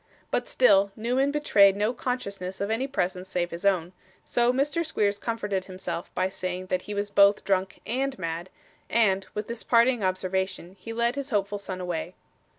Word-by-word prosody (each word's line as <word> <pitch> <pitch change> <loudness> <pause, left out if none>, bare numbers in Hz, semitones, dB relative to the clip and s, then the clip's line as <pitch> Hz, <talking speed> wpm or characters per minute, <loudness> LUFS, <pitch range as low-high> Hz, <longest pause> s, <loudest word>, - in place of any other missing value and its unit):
But, - - 0
still 200 -5 +4
Newman 250 +5 +1
betrayed 210 -10 +5
no 210 +4 +1
consciousness 200 -7 -4
of 200 +2 -1
any 245 +5 0
presence 185 -7 -2
save 175 -2 -1
his 170 +4 -1
own; 180 -2 +1 0.3
so, 240 0 +2
Mr. 280 +5 0
Squeers 205 -10 0
comforted 205 -5 -2
himself 185 -1 -5
by 185 - +2
saying 185 -1 -4
that 185 - +1
he 205 - -6
was 205 0 -2
both 200 0 +5
drunk 190 -1 0
AND 265 +3 -1
mad; 170 0 -4 0.4
and, 195 -4 +2
with 210 0 -3
this 235 -1 -5
parting 235 -1 +3
observation, 185 -1 -2
he 225 - -7
led 235 +1 +1
his 280 0 -5
hopeful 205 -2 0
son 190 -2 -6
away. 175 0 -4
200 Hz, 175 wpm, -27 LUFS, 185-235 Hz, 0.4 s, betrayed